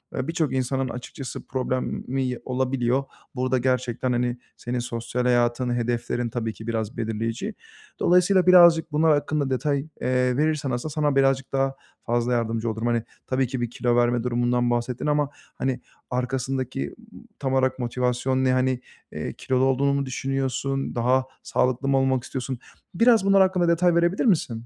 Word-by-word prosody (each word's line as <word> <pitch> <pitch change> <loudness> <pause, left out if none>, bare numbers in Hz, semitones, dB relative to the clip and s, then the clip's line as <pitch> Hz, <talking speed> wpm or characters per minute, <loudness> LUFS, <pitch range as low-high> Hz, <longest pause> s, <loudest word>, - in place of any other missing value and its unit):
eee, 130 - -2
birçok 160 -5 -1
insanın 130 0 -1
açıkçası 125 +1 -7
problemi 130 0 -2
olabiliyor. 130 0 0 0.3
Burada 130 0 +1
gerçekten, 125 0 0
hani, 120 0 0 0.2
senin 120 +1 -3
sosyal 120 +1 -3
hayatın, 120 0 +2
hedeflerin 120 0 -1
tabii 115 -1 -3
ki 110 - -11
biraz 110 -1 -3
belirleyici. 115 0 -3 0.5
Dolayısıyla 180 +1 +4
birazcık 170 -3 +7
bunlar 155 +2 +3
hakkında 145 -1 0
detay, 140 +2 0 0.2
eee, 125 0 +1
verirsen 150 -2 0
aslında 120 +6 -3
sana 145 -1 +1
birazcık 135 -1 +2
daha 135 0 +1 0.3
fazla 120 +1 +1
yardımcı 115 -1 -1
olurum. 110 +1 -2
Hani, 120 -1 +1 0.2
tabii 130 0 +1
ki 130 0 -4
bir 120 - -1
kilo 120 0 0
verme 120 -1 +2
durumundan 120 0 +1
bahsettin 120 +1 -1
ama, 150 -1 +1 0.3
hani, 130 -1 -1 0.3
arkasındaki 130 +1 -2 0.4
tam 135 -2 -1
olarak 130 0 +1
motivasyon 125 +2 0
ne? 130 - +3
Hani, 130 -1 +1 0.3
eee, - - -5
kilolu 130 0 0
olduğunu 135 +1 +2
mu 140 0 0
düşünüyorsun? 135 +1 -2
Daha 125 +2 +2 0.2
sağlıklı 130 +2 0
mı 135 0 +3
olmak 130 -2 +1
istiyorsun? 130 -1 -5 0.3
Biraz 230 +2 +4
bunlar 195 0 +5
hakkında 185 -2 +3
detay 170 +1 +3
verebilir 170 +5 +2
misin? 125 - +1
130 Hz, 155 wpm, -24 LUFS, 120-135 Hz, 0.5 s, birazcık